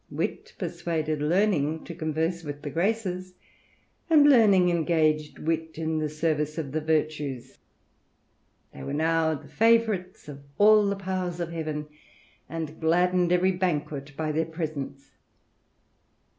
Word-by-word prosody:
Wit - - -4
persuaded 155 -3 -2
Learning 160 -2 +1
to 170 - -8
converse 160 +2 -2
with 145 -1 -7
the 145 - -4
Graces, 185 0 -2 0.7
and 300 -3 +7
Learning 205 -9 +6
engaged 155 -3 +1
Wit 160 0 -2
in 160 -1 -1
the 155 -1 -1
service 155 0 -1
of 150 -4 -4
the 155 +2 -1
Virtues. 150 -5 -2 1.1
They - - -10
were 140 - -4
now 160 0 +2
the - - -11
favourites. 225 -5 +1
THE 150 - -8
RAMBLER. 140 0 -12
of - - -26
all 210 0 +6
the 200 - 0
powers 185 -2 -3
of 170 -1 -3
heaven, 155 -2 -4 0.6
and 160 -1 -5
gladdened 175 +2 +2
every 180 +1 +3
banquet 150 -6 -3
by 155 -1 -1
theii 160 +1 -1
presence. 145 -4 -5
160 Hz, 140 wpm, -26 LUFS, 150-180 Hz, 1.1 s, and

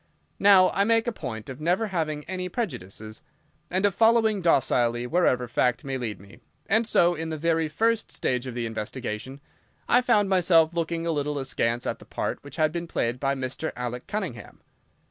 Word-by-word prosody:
Now, 195 -2 +6
I 200 - +2
make 225 +1 +2
a 240 - 0
point 115 - -6
of 130 +2 -8
never 180 +7 +1
having 155 -5 -2
any 185 +2 -4
prejudices, 110 - -5 0.5
and 185 +2 +1
of 200 - +2
following 225 -2 +3
docilely 120 -7 +2
wherever 125 -4 +2
fact 125 +3 +1
may 135 -2 -3
lead 115 -6 -4
me, 100 +1 -16 0.3
and 220 +2 +2
so, 175 -5 +4
in 160 -1 -4
the 160 - -3
very 165 0 +1
first 225 +8 0
stage 125 0 -2
of 125 - -6
the 120 -1 -2
investigation, 115 +3 -5 0.5
I 245 - +5
found 215 -5 +3
myself 170 -3 +4
looking 170 0 -2
a 170 - +1
little 150 -1 -1
askance 120 -3 -1
at - - -3
the - - -14
part - - -4
which 145 - -10
had 155 -2 +2
been 170 +1 -4
played 120 -6 -1
by 135 +1 0
Mr. 135 +4 -4
Alec 125 0 -5
Cunningham. 195 - -5
155 Hz, 185 wpm, -26 LUFS, 125-185 Hz, 0.5 s, Now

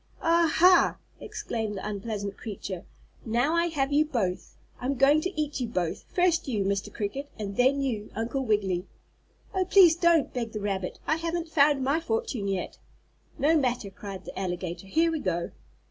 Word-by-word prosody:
"Ah, 335 -1 +4
ha!" 360 +2 +5 0.2
exclaimed 220 -3 -4
the 195 - -5
unpleasant 205 -1 -4
creature. 195 -4 -6 0.4
"Now 240 +7 +1
I 335 0 +2
have 285 -4 -1
you 300 +2 +5
both. 220 -12 -3 0.2
I'm 265 +3 -1
going 280 +4 +5
to 370 -1 -4
eat 300 -2 -1
you 245 - -1
both, 180 -7 -2
first 355 -4 +2
you, 215 -6 0
Mr. 200 0 -1
Cricket, 270 +7 -4
and 200 -2 -5
then 265 +4 +3
you, 220 -6 -2
Uncle 235 +5 -2
Wiggily." 195 -5 0 0.7
"Oh, 375 - +2
please 365 -3 +6
don't," 340 -3 +3
begged 235 -3 -3
the 215 - -3
rabbit. 195 -3 -3
"I 315 - +1
haven't 335 0 -3
found 285 -3 +4
my 280 +5 +2
fortune 335 - -2
yet." 195 -2 -3 0.6
"No 310 +4 +3
matter," 245 -8 0
cried 195 -1 -8
the - - -7
alligator, 180 -1 -4
"here 330 +10 +2
we 320 - -2
go!" 175 -7 -2
250 Hz, 175 wpm, -27 LUFS, 200-315 Hz, 0.7 s, please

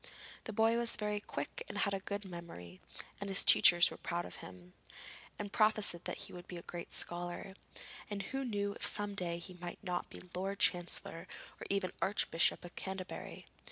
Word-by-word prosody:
The - - -4
boy 225 +2 +3
was 235 0 +3
very 210 -1 -1
quick 345 - -5
and - - -5
had 200 - +1
a 195 - 0
good 200 +1 -4
memory 165 - -9 0.4
and 200 -1 -4
his 195 - +5
teachers 175 -1 +8
were - - -8
proud 175 0 -3
of - - -8
him, 90 -1 -12 0.6
and 205 -1 -5
prophesied 215 -5 +3
that - - -3
he - - -11
would 175 0 -9
be 180 - -6
a 170 - -8
great 175 -1 -7
scholar, 175 +2 -1 0.6
and 200 -1 -3
who 270 +7 -3
knew 205 -4 -1
if - - -7
some 205 0 +5
day 175 -3 -2
he 180 +2 -8
might 175 +3 -8
not 180 -2 -2
be - - -10
Lord 195 +2 -2
Chancellor, 175 -2 +1 0.3
or - - -7
even 195 -2 0
Archbishop 185 -4 +1
of 175 - -11
Canterbury? 190 -1 -6
190 Hz, 190 wpm, -35 LUFS, 175-205 Hz, 0.6 s, teachers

